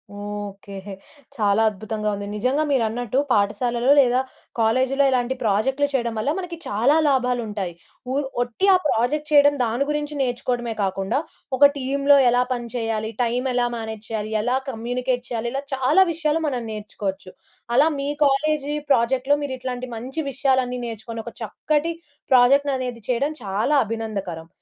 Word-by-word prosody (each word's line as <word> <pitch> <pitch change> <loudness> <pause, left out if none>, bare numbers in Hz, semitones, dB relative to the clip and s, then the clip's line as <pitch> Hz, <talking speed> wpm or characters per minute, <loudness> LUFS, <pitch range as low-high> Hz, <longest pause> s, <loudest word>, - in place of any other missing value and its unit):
Okay. 205 -1 -7 0.6
చాలా 205 0 +2
అద్భుతంగా 215 +1 -4
ఉంది. 200 0 -5
నిజంగా 255 +8 +1
మీరన్నట్టు 245 -1 0
పాఠశాలలో 235 +4 +1
లేదా 250 -1 +4 0.4
కాలేజీలో 260 +5 +2
ఇలాంటి 250 0 +1
ప్రాజెక్ట్‌లు 260 +7 +1
చేయడం 235 -3 0
వల్ల 245 - 0
మనకి 350 -2 -6
చాలా 235 +9 +3
లాభాలు 250 -3 +2
ఉంటాయి. 195 -5 -4 0.4
వు 260 - -1 0.3
ఒట్టి 245 +10 -1
ఆ - - +7
ప్రాజెక్ట్ 295 +6 0
చేయడం, 290 -1 +6
దాని 240 +4 0
గురించి 295 0 -2
నేర్చుకోవడమే 245 -2 -1
కాకుండా 195 +4 -1 0.4
ఒక 285 - +8
టీమ్‌లో 280 +1 +3
ఎలా 245 +1 +3
పని 240 -1 -5
చేయాలి? 225 -2 -2
టైమ్ 245 +3 0
ఎలా 245 0 +2
మేనేజ్ 220 -2 -6
చేయాలి? 215 -1 -3
ఎలా 245 +3 0
కమ్యూనికేట్ 245 +1 -2
చేయాలి? 235 -1 -2
ఇలా 275 +1 -2
చాలా 265 +8 +4
విషయాలు 320 0 0
మనం 250 -4 -2
నేర్చుకోవచ్చు. 205 -3 -5 0.5
అలా 290 +5 +6
మీ 275 - -2 0.2
కాలేజీ 295 +1 +1 0.2
ప్రాజెక్ట్‌లో 265 +3 +3
మీరిట్లాంటి 255 -2 -4
మంచి 255 +7 -6
విషయాలన్నీ 260 -2 +1
నేర్చుకొని, 230 0 -6
ఒక 235 - -7
చక్కటి 300 +8 -1 0.4
ప్రాజెక్ట్ 270 +3 +5
అనేది 250 -2 -5
చేయడం 265 +5 +1
చాలా 210 +9 0
అభినందకరం. 200 -7 -4
245 Hz, 140 wpm, -23 LUFS, 220-270 Hz, 0.6 s, ఒక